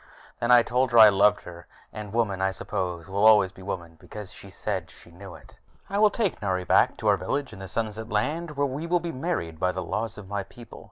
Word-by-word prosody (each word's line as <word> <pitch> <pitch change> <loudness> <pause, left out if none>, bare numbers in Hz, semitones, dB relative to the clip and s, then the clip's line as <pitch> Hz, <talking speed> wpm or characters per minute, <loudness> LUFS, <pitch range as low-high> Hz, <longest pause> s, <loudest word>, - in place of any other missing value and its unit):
Then 120 - -1
I 120 -1 +7
told 125 +2 +1
her - - +4
I 110 -1 +10
loved 105 +1 +3
her, 85 -1 -12 0.3
and 105 -2 -7
women, 105 -4 0
I 95 - +2
suppose, 90 -3 -4
will 100 +2 -1
always 105 -4 +6
be 95 - -15
women, 85 -4 -6
because 105 -3 -10
she 100 - -13
said 95 -3 -4
she 85 - -17
knew 95 +2 -11
it. - - -17 0.3
I 200 - 0
will 215 0 +6
take 205 - -2
Nari 95 -3 -1
back - - +3
to - - -3
our - - +4
village 140 -1 -3
in - - -11
the 95 - -7
Sunset 110 +1 -4
Land, 150 +8 -2
where 145 - +2
we 140 +5 -4
will 175 +1 +2
be 170 0 -5
married 130 - -3
by 90 +2 +1
the 95 0 -4
laws 110 +5 -3
of 105 -2 -10
my 100 0 -3
people. 115 +4 -13
105 Hz, 240 wpm, -26 LUFS, 95-125 Hz, 0.3 s, I